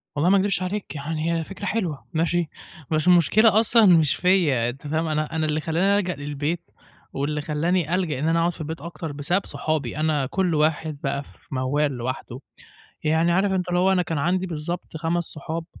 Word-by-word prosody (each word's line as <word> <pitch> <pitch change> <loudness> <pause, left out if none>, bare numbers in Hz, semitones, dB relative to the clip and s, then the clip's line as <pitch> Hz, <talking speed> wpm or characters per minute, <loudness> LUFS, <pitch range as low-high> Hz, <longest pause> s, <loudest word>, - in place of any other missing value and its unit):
والله 150 +5 +2
ما 200 - +5
اكدبش 195 -2 +1
عليك 190 -1 -4
يعني، 155 +3 -2
هي 165 -1 -1
فكرة 195 +4 -8
حلوة، 185 -9 -2
ماشي 170 0 0 0.4
بس 155 +1 +1
المشكلة 200 +5 +5
أصلًا 225 0 +5
مش 165 -6 +5
فيّا 165 -11 +2
أنت 135 +4 -8
فاهم؟ 160 +2 -1
أنا 155 +1 -2
أنا 160 -1 +1
اللي 155 0 -1
خلّاني 185 +6 +2
الجأ 180 -3 -2
للبيت، 145 +4 -3 0.5
واللي 150 +2 -2
خلّاني 165 +3 0
ألجأ 165 -7 -1
إن 155 - 0
أنا 165 +1 +2
اقعُد 170 +1 +2
في - - -10
البيت 155 -1 -5
أكتر 170 -1 -6
بسبب 145 +7 -1
صحابي، 155 +1 -2
أنا 155 -3 +1
كل 180 +4 0
واحد 155 0 0
بقى 140 0 -1
في - - -20 0.3
موال 140 +3 +1
لوحده، 130 0 -5 0.6
يعني 160 +2 +2
عارف 190 +3 +2
أنت 185 -1 -1
اللي 175 0 +1
هو 190 +1 +4
أنا 185 -1 +3
كان 165 -2 -3
عندي 180 +5 +1
بالضبط 165 0 -5
5 170 +2 0
صحاب 160 +1 -5
160 Hz, 195 wpm, -24 LUFS, 150-180 Hz, 0.6 s, ما